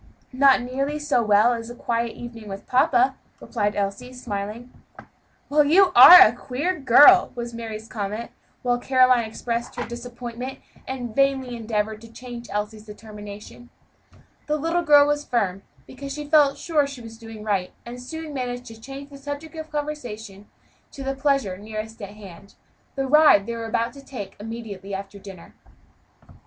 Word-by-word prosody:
"Not 265 -1 +4
nearly 275 +4 -2
so 295 -5 +1
well 215 +2 +4
as 230 0 -6
a 240 - -8
quiet 235 -1 -2
evening 230 -3 -9
with 195 0 -8
papa," 255 +1 +2 0.2
replied 210 -3 -2
Elsie, 205 +5 -3
smiling. 230 0 -6 0.8
"Well, 295 +1 +4
you 360 +6 +5
are 345 +9 +12
a 215 - +8
queer 280 +9 -3
girl!" 290 +8 +7
was 235 -1 -6
Mary's 225 -1 -7
comment, 215 +1 -5 0.3
while 245 -1 +1
Caroline 255 -2 +3
expressed 235 +2 -4
her - - -4
disappointment 240 +2 -7 0.3
and 245 -4 -5
vainly 270 -3 +1
endeavored 220 -1 -3
to 230 -1 -14
change 240 0 -9
Elsie's 210 +1 -5
determination. 210 +2 -11 0.8
The 300 0 0
little 330 +3 0
girl 295 -3 +6
was 295 0 0
firm, 200 -8 -1 0.2
because 275 +1 -9
she 295 +1 -5
felt 290 -2 +4
sure 300 -4 0
she 275 -3 -9
was 225 -1 -11
doing 225 -2 -10
right, 195 -4 -1
and 245 +1 -8
soon 320 +3 -7
managed 245 -2 -4
to 225 -1 -12
change 275 +3 -9
the 280 - -11
subject 290 +3 -7
of 315 -1 -8
conversation 235 -9 -6 0.4
to 275 - -8
the 270 0 -2
pleasure 270 -9 0
nearest 215 +1 -7
at 200 +1 -8
hand 200 -1 -13 0.4
the 270 -1 -1
ride 300 -7 +5
they 235 - -4
were 230 -1 -5
to 235 +5 -2
take 205 -9 -8
immediately 205 -3 -7
after 200 +1 -8
dinner. 195 -3 -12
240 Hz, 160 wpm, -23 LUFS, 215-275 Hz, 0.8 s, are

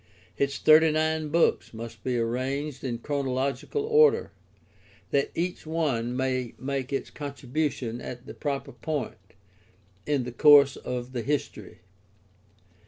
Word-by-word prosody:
Its 140 0 0
thirty 155 +1 +6
nine 155 0 0
books 165 -6 +1
must 115 -1 -8
be 125 -2 0
arranged 130 +4 -2
in 120 -3 -2
chrono 140 +1 -2
logical 135 - -2
order, 455 +1 +4 0.8
that 140 - +2
each 175 -1 -3
one 130 -7 -1
may 130 -2 -1
make 135 0 -3
its 135 - -3
contribution 140 -3 -3
at 125 0 -8
the - - -8
proper 140 -2 -3
point 120 - -5 0.7
in 145 -3 +1
the 125 - -5
course 140 +1 +7
of 125 0 -5
the 120 - -2
history. 145 +4 -4
140 Hz, 130 wpm, -27 LUFS, 125-150 Hz, 0.8 s, course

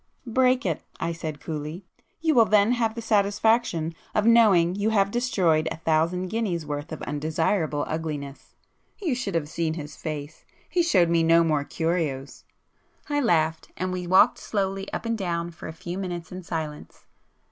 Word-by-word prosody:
'Break 255 +1 +2
it,'—I 165 0 -3
said 160 -3 -5
coolly—'You 170 - -4
will 235 -4 +6
then 210 +1 +4
have 230 -2 0
the 230 - -5
satisfaction 205 -5 +2 0.2
of 210 - +2
knowing 210 -7 +5
you 205 +3 0
have 200 -2 +2
destroyed 190 -11 +2
a - - -5
thousand 165 +3 0
guineas' 185 -7 -2
worth 145 +1 -5
of 155 - -6
undesirable 155 +1 0
ugliness.' 150 -3 -5 0.4
You 350 -9 0
should 225 -7 -3
have 155 -3 0
seen 160 0 -2
his 150 -3 -7
face! 145 +2 -6 0.2
He 360 - +1
showed 185 - +3
me 170 -1 +3
no 165 +1 +5
more 155 -3 +1
curios!" 155 -4 -2 0.6
I 290 0 +1
laughed, 160 - +1
and 185 +1 -2
we 180 -1 -4
walked 185 +2 +5
slowly 195 -1 -2
up - - -4
and 230 0 0
down 170 -4 -2
for 170 - -10
a - - -5
few 175 +3 -6
minutes 175 -3 -5
in 185 0 -6
silence. 160 -3 -6
175 Hz, 165 wpm, -25 LUFS, 160-210 Hz, 0.6 s, will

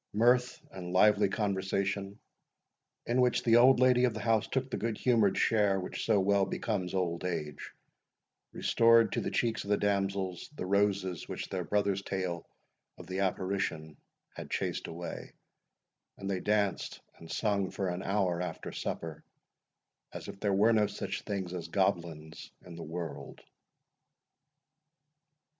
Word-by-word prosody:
Mirth 125 +3 +3
and 90 -2 -7
lively 100 +1 +5
conversation, 100 -1 -1 0.9
in 125 +2 +2
which 125 -1 +2
the 115 -1 +5
old 125 +1 +6
lady 125 -1 +5
of 120 -3 0
the - - -4
house 110 0 +1
took 130 0 -2
the - - -1
good 115 -1 -2
humoured 110 -6 +3
share 105 -4 +3
which 90 - -5
so 100 - +4
well 100 +1 +3
becomes 95 -3 -2
old 85 -2 -1
age, 75 -5 -4 0.8
restored 115 0 +4
to - - -1
the - - -2
cheeks 115 -2 0
of 100 - -9
the 105 - +3
damsels 95 -3 -1
the 90 - -4
roses 100 -2 0
which - - -5
their - - -2
brother's 100 -1 0
tale 90 -4 -3 0.5
of 90 - -10
the 95 +2 -4
apparition 95 -5 -2 0.4
had - - -8
chased - - -2
away, 85 +1 -7 0.8
and 95 - -6
they 95 -1 -1
danced 105 -1 0 0.2
and 80 - -10
sung 100 -3 0
for 95 - -3
an 90 +1 -3
hour 95 -4 0
after 90 - -5
supper 80 -2 -5 0.9
as - - -8
if 100 - -8
there 100 -1 0
were 110 +4 +5
no 105 -2 +3
such - - -4
things 95 -3 -4
as 90 -2 -5
goblins 80 -2 -2 0.2
in 90 - -10
the 85 - -8
world. 80 -2 -6
100 Hz, 150 wpm, -31 LUFS, 90-105 Hz, 0.9 s, old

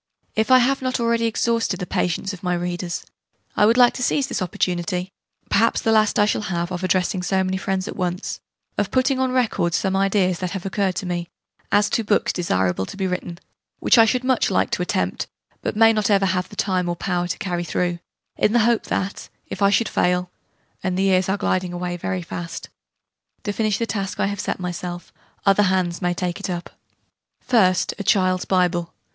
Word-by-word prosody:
If 220 +2 +1
I 255 - +8
have 265 +2 +2
not 255 -1 -1
already 230 0 +1
exhausted 225 -4 0
the 180 - -3
patience 180 +3 -1
of 190 - -9
my 180 -1 0
readers, 175 0 -3 0.5
I 210 - +5
would 230 +2 +3
like 245 -1 +6
to - - -6
seize 275 +2 +1
this 255 - -3
opportunity 180 +1 -2 0.4
perhaps 230 +3 +3
the 225 - +1
last 215 +1 +3
I 205 - +5
shall 210 - 0
have 170 0 -2
of 180 0 -4
addressing 185 0 +1
so 190 +1 +1
many 190 0 -1
friends 190 0 -2
at - - -5
once 180 0 -3 0.4
of 205 - 0
putting 260 +1 +1
on 260 -1 +1
record 225 -9 +1
some 190 -1 0
ideas 195 -2 +2
that 185 0 -3
have 185 - -9
occurred 195 -1 0
to - - -3
me, 175 -1 -3 0.4
as 205 +1 +4
to 230 - +1
books 205 0 +1
desirable 95 - 0
to - - -9
be 190 - -1
written 180 -2 -3 0.4
which - - +4
I 225 - +8
should 250 +3 +1
much 255 0 +2
like - - +1
to - - -1
attempt, - - -1 0.3
but - - -2
may 225 +1 +6
not 215 -1 0
ever 200 -1 +4
have 180 -1 0
the - - -12
time 185 -3 0
or 175 - -1
power 175 0 -1
to 180 - -3
carry 175 -4 -2
through 175 0 -1 0.4
in 210 - +2
the 240 - +5
hope 235 -1 +2
that, 195 +1 -3 0.2
if 190 - -6
I 200 - +5
should 225 +3 +2
fail 180 0 0 0.5
(and 185 -1 -1
the 190 - +2
years 190 -1 +3
are 195 - +1
gliding 185 -2 -1
away 175 0 -3
very 180 +1 -3
fast) 170 0 -6 0.7
to 205 - -2
finish 215 -2 0
the 230 - -1
task 200 -3 -3
I - - +2
have 200 0 -3
set - - -2
myself, 175 0 -5 0.3
other 195 +1 +5
hands 185 -3 +1
may 175 -1 0
take 180 +1 -3
it 200 - -4
up. 175 -1 -4 0.7
First, 190 -8 +2
a - - -2
Child's 185 -2 +2
Bible. 180 -2 0
190 Hz, 210 wpm, -22 LUFS, 180-215 Hz, 0.7 s, I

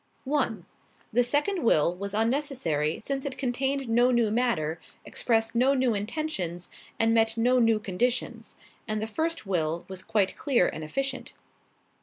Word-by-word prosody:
"1. 260 - -1 0.5
The 245 +2 +4
second 295 +9 +1
will 170 -5 +3
was 200 +2 -5
unnecessary 225 - 0
since 275 -1 -3
it 275 -2 -5
contained 270 +1 -1
no 240 +2 +4
new 235 -4 +2
matter, 170 -10 0 0.3
expressed 225 -1 0
no 255 +4 +3
new 255 -3 +2
intentions 200 - -3 0.3
and 225 0 +3
met 225 0 +2
no 250 +2 +3
new 225 -2 +4
conditions, 230 +3 -2 0.3
and 215 -1 -1
the 215 - -2
first 320 +6 -2
will 170 -3 -1
was 190 -1 -7
quite 195 -3 0
clear 260 - +2
and 155 - -5
efficient. 265 - -3
230 Hz, 150 wpm, -27 LUFS, 195-265 Hz, 0.5 s, The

